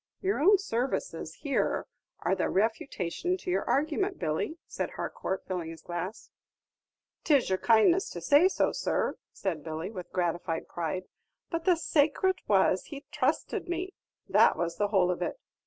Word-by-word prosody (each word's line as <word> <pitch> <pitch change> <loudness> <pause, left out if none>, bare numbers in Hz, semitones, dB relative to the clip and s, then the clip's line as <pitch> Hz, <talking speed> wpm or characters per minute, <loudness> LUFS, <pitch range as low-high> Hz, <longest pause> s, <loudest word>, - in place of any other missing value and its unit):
"Your 390 +1 0
own 395 +7 +6
services 270 - -2
here 285 -3 0 0.4
are - - +1
the - - 0
refutation 220 - -1
to 365 0 -4
your - - +1
argument, 320 +7 +1
Billy," 160 - -2
said - - -3
Harcourt, 190 - -4
filling 180 -3 -3
his 165 -1 -10
glass. 180 +5 -5 0.9
"'Tis 285 - +3
your 190 0 +1
kindness 235 - +4
to 175 - -6
say 285 - +5
so, 380 - +1
sir," - - -1
said 170 -7 -3
Billy, 160 +4 -4
with 185 -5 -8
gratified 175 -2 -1
pride; 175 +2 -3 0.5
"but 330 -1 -2
the 365 -2 +5
sacrat 325 +3 +2
was, 190 -2 +3
he 285 -1 -9
thrusted - - 0
me, 355 +2 -3 0.3
that - - +5
was 170 -1 -2
the 205 - +2
whole 190 -3 +3
of 180 - -4
it. - - -2
225 Hz, 155 wpm, -29 LUFS, -, 0.9 s, own